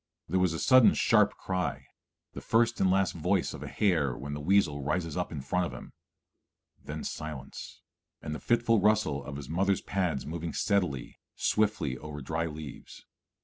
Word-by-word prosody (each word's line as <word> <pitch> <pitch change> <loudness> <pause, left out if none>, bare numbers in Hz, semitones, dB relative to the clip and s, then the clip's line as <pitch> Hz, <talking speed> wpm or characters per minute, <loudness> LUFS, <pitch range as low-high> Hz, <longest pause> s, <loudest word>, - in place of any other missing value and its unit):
There 95 +4 +1
was 90 -2 +2
a - - -3
sudden 130 -2 +6
sharp - - +3
cry, 95 -1 -2 0.5
the - - -7
first 115 +1 +2
and 95 - +4
last 95 0 +2
voice 90 +2 0
of - - -8
a - - -6
hare 80 - +1
when 70 +2 -6
the 75 - -5
weasel 80 -4 +2
rises 80 +3 -2
up 90 -1 -2
in 75 -4 -5
front 90 +7 0
of - - -9
him; - - -10 0.9
then - - -6
silence, 75 -3 -7 0.4
and 75 - -5
the 75 - -5
fitful 115 -2 +2
rustle 105 -9 +2
of 70 - -7
his 70 -2 -7
mother's 95 +5 +1
pads 90 -8 -1
moving 80 +1 -4
steadily, 90 -11 -1 0.2
swiftly 100 -12 0
over 75 -1 -7
dry 80 +4 -2
leaves. 75 -3 -9
85 Hz, 175 wpm, -29 LUFS, 75-95 Hz, 0.9 s, sudden